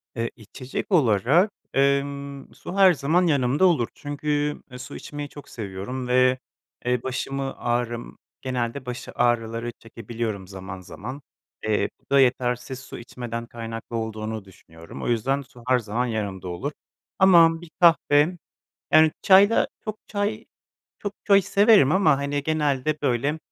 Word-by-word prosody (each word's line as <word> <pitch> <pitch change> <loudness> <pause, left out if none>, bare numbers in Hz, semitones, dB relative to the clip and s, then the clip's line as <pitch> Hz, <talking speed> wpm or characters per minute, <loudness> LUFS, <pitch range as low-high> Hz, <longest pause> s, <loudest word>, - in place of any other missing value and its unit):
E, 115 0 -1
içecek 125 - -7
olarak, 145 - +4 0.3
ımm, 140 0 0
su 180 - -8
her 190 -2 +7
zaman 165 +5 +2
yanımda 140 +2 +2
olur 155 -11 +3
çünkü, 145 0 -2
ııı, 125 - -9
su 125 - -8
içmeyi 145 -1 -7
çok 145 - -12
seviyorum 110 +5 -5
ve, 130 +1 +3 0.5
eee, 125 -1 0
başımı 135 +1 -3
ağrım 120 -1 -2 0.2
genelde 130 0 -3
baş 125 -1 -6
ağrıları 120 -1 0
çekebiliyorum 115 -3 -5
zaman 95 -1 -8
zaman. 130 +9 -8 0.4
Eee, 110 -1 +1
bu - - -38
da 140 - +5
yetersiz 125 0 +1
su 135 - -10
içmeden 120 -1 -6
kaynaklı 115 0 -7
olduğunu 110 -1 -4
düşünüyorum. 85 -3 -13
O - - -2
yüzden 125 +4 +1
su 125 -2 -16
her 130 -1 +4
zaman 115 +2 -2
yanımda 100 -6 -4
olur. 90 +12 -4 0.5
Ama 170 -4 +6
bir 175 - -12
kahve, 170 -1 +4 0.6
yani 155 0 +6
çayla 200 +3 +6 0.2
çok 215 -1 -4
çay 205 0 -2 0.5
çok 205 -1 -4
çay 200 -1 +5
severim 200 - +5
ama 170 -7 +4
hani 140 0 -2
genelde 150 -1 0
böyle 140 +3 0
130 Hz, 140 wpm, -24 LUFS, 115-150 Hz, 0.6 s, her